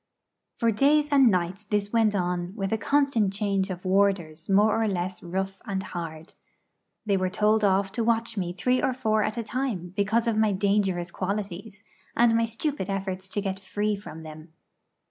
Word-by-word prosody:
For 230 Hz, -1 st, +2 dB
days 290 Hz, +6 st, +3 dB
and 270 Hz, -4 st, +6 dB
nights 185 Hz, +1 st, -1 dB
this 205 Hz, 0 st, -2 dB
went 220 Hz, -2 st, +3 dB
on 180 Hz, 0 st, -2 dB
with 195 Hz, -1 st, -2 dB
a -, -, +2 dB
constant 275 Hz, -8 st, +2 dB
change 200 Hz, -1 st, -1 dB
of 185 Hz, 0 st, -6 dB
warders 185 Hz, -4 st, +1 dB
more 210 Hz, +3 st, +4 dB
or 220 Hz, -, +2 dB
less 185 Hz, -2 st, -3 dB
rough 190 Hz, +2 st, -4 dB
and 195 Hz, -1 st, -2 dB
hard. 165 Hz, -3 st, -7 dB, 0.7 s
They 200 Hz, -2 st, +2 dB
were 185 Hz, 0 st, 0 dB
told 215 Hz, +2 st, +2 dB
off 195 Hz, -1 st, +2 dB
to 230 Hz, -, -1 dB
watch 230 Hz, 0 st, 0 dB
me 180 Hz, -4 st, -2 dB
three 250 Hz, +8 st, +1 dB
or 260 Hz, -, +1 dB
four 220 Hz, -4 st, +1 dB
at 215 Hz, +2 st, -1 dB
a 230 Hz, -, -1 dB
time, 215 Hz, -7 st, -3 dB
because 220 Hz, +3 st, +1 dB
of 220 Hz, -2 st, +1 dB
my 215 Hz, -2 st, +3 dB
dangerous 190 Hz, -3 st, 0 dB
qualities, 200 Hz, +1 st, -4 dB, 0.3 s
and 235 Hz, -1 st, +5 dB
my 230 Hz, 0 st, +2 dB
stupid 230 Hz, -, -3 dB
efforts 190 Hz, -1 st, -3 dB
to 205 Hz, -, -2 dB
get 195 Hz, -1 st, -3 dB
free 205 Hz, +2 st, -1 dB
from 160 Hz, -5 st, -10 dB
them. 155 Hz, +1 st, -11 dB
200 Hz, 185 wpm, -26 LUFS, 185-220 Hz, 0.7 s, and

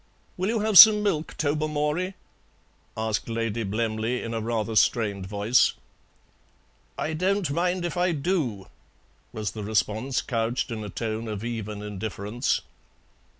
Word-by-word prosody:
"Will 185 Hz, +3 st, -1 dB
you 230 Hz, 0 st, 0 dB
have 215 Hz, -3 st, +6 dB
some 210 Hz, -1 st, +10 dB
milk, 165 Hz, -7 st, -1 dB
Tobermory?" 150 Hz, +4 st, -1 dB, 0.8 s
asked 110 Hz, 0 st, -2 dB
Lady 115 Hz, 0 st, -2 dB
Blemley 110 Hz, +3 st, -2 dB
in 115 Hz, -, -5 dB
a 115 Hz, -, -2 dB
rather 110 Hz, -1 st, -2 dB
strained 100 Hz, -3 st, +2 dB
voice. 105 Hz, +4 st, +2 dB, 1.2 s
"I 160 Hz, -, -2 dB
don't 185 Hz, 0 st, 0 dB
mind 175 Hz, +3 st, 0 dB
if 175 Hz, -, -4 dB
I 180 Hz, 0 st, +2 dB
do," 140 Hz, -, -1 dB, 0.7 s
was 105 Hz, -2 st, -4 dB
the 110 Hz, -, -7 dB
response, 110 Hz, +4 st, -1 dB
couched 120 Hz, +2 st, -2 dB
in 110 Hz, -2 st, -4 dB
a 105 Hz, -, -6 dB
tone 110 Hz, +2 st, -4 dB
of 105 Hz, -1 st, -5 dB
even 110 Hz, -3 st, -5 dB
indifference. 105 Hz, +2 st, -2 dB
115 Hz, 135 wpm, -25 LUFS, 110-160 Hz, 1.2 s, some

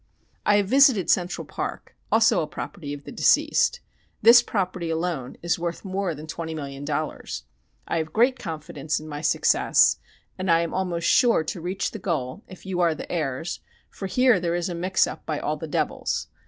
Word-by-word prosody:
I 205 Hz, -, +5 dB
have 205 Hz, -1 st, +2 dB
visited 260 Hz, -6 st, +5 dB
Central 180 Hz, 0 st, 0 dB
Park, -, -, -6 dB, 0.2 s
also 225 Hz, -1 st, +4 dB
a 155 Hz, -, -3 dB
property 160 Hz, -5 st, -7 dB
of 145 Hz, 0 st, -7 dB
the -, -, -9 dB
deceased; -, -, +3 dB, 0.4 s
this 235 Hz, +2 st, +9 dB
property 185 Hz, -6 st, -2 dB
alone 160 Hz, -6 st, -3 dB
is 170 Hz, 0 st, 0 dB
worth 170 Hz, +3 st, -4 dB
more 190 Hz, -3 st, -2 dB
than 150 Hz, +2 st, -9 dB
twenty 160 Hz, 0 st, -5 dB
million 140 Hz, -2 st, -6 dB
dollars.... 150 Hz, +1 st, -3 dB, 0.4 s
I -, -, -1 dB
have 160 Hz, -1 st, -2 dB
great 245 Hz, +3 st, +3 dB
confidence 155 Hz, -, -4 dB
in 155 Hz, -, -10 dB
my 145 Hz, -1 st, -6 dB
success, 155 Hz, -, +3 dB, 0.4 s
and 185 Hz, 0 st, -2 dB
I 165 Hz, 0 st, +5 dB
am 170 Hz, -, -3 dB
almost 180 Hz, -3 st, -1 dB
sure 235 Hz, -9 st, +4 dB
to 165 Hz, +2 st, -5 dB
reach 185 Hz, +3 st, -2 dB
the 215 Hz, -, -7 dB
goal, 165 Hz, -3 st, -3 dB
if 185 Hz, -, -13 dB
you 190 Hz, -2 st, -3 dB
are 170 Hz, -2 st, +3 dB
the -, -, -8 dB
heirs, 160 Hz, 0 st, -2 dB, 0.3 s
for 195 Hz, -, -6 dB
here 250 Hz, +1 st, +4 dB
there 170 Hz, -1 st, -1 dB
is 175 Hz, +1 st, -1 dB
a -, -, -3 dB
mix 185 Hz, +3 st, +2 dB
up -, -, -7 dB
by -, -, -1 dB
all -, -, -2 dB
the -, -, -6 dB
devils.... -, -, -2 dB
175 Hz, 195 wpm, -25 LUFS, 155-195 Hz, 0.4 s, this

